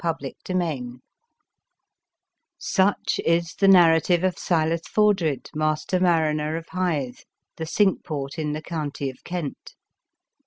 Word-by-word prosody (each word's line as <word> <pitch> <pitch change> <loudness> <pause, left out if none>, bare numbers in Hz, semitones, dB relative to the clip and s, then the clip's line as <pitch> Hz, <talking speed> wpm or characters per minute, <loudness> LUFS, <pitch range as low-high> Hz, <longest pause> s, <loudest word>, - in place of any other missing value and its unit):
APPENDIX 155 -4 -3 1.6
SUCH 195 +1 +1
is 170 0 +1
the 195 - +4
narrative 175 -1 +5
of 185 -1 +1
Silas 165 -1 +1
For 210 -1 +4
dred, 160 -8 -3
master 155 +4 0
mariner 160 -3 +1
of 165 - -9
Hythe, 155 -9 -2 0.4
the 160 - -4
cinque 195 +2 +2
port 140 -1 -5
in 150 -1 -2
the 155 +1 -5
county 145 -4 -4
of 130 - -22
Kent. 175 -6 -6
165 Hz, 120 wpm, -24 LUFS, 150-180 Hz, 1.6 s, narrative